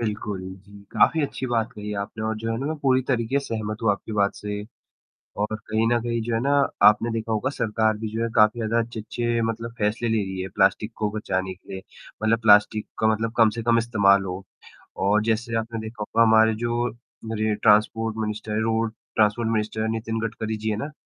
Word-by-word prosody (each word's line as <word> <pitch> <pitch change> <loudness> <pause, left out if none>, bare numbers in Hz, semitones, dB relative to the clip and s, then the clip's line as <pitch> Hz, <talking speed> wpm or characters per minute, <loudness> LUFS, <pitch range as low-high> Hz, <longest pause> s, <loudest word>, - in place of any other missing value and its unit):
बिल्कुल 105 -3 -3
जी, 100 +2 -11
काफ़ी 160 -2 +3
अच्छी 135 -2 -3
बात 115 -2 -1
कही 105 0 -6
आपने 110 +2 -7
और 110 0 -1
जो 115 +1 -3
है 115 - -1
ना 135 - -3
मैं 155 +1 -2
पूरी 130 -1 +3
तरीके 125 +1 +1
से 140 - -5
सहमत 110 0 -4
हूँ 115 - +3
आपकी 100 +2 -3
बात 100 -1 +1
से। 105 0 -5 0.8
और 105 +1 -1
कहीं 110 +1 +1
न 120 0 +2
कहीं 115 0 -2
जो 115 +1 -3
है 115 - +1
ना 140 +3 +1 0.3
आपने 105 +2 +6
देखा 115 0 -3
होगा 110 +4 0
सरकार 110 -4 0
भी 110 - -4
जो 115 - -2
है 115 - -1
काफ़ी 110 +1 +4
ज़्यादा 115 +1 +1
अच्छे-अच्छे 115 +1 -2
मतलब 115 +1 -3
फैसले 110 +2 0
ले 110 - +2
रही 95 -1 -5
है 95 - -4
प्लास्टिक 100 +3 +2
को 105 -1 0
बचाने 95 -3 -2
के 90 - -16
लिए, 95 - -6 0.4
मतलब 115 +1 +3
प्लास्टिक 105 0 +5
का 110 - +3
मतलब 110 +1 0
कम 115 -2 +6
से 115 - -3
कम 115 0 +3
इस्तेमाल 100 -4 +3
हो 95 +1 -5 0.6
और 105 +2 +3
जैसे 115 +1 -1
आपने 115 0 -5
देखा 110 0 -8
होगा, 110 +2 0
हमारे 110 0 +5
जो 120 +1 -1
हमारे 110 -2 -4
ट्रांसपोर्ट 110 +1 +2
मिनिस्टर 110 0 -4
हैं, 105 - 0
road 115 0 0 0.2
transport 110 +1 +2
minister 110 0 -1
Nitin 115 0 -3
Gadkari 110 0 -4
ji 110 +1 -3
हैं 105 - -1
ना, 140 +8 -5
110 Hz, 215 wpm, -24 LUFS, 105-115 Hz, 0.8 s, आपने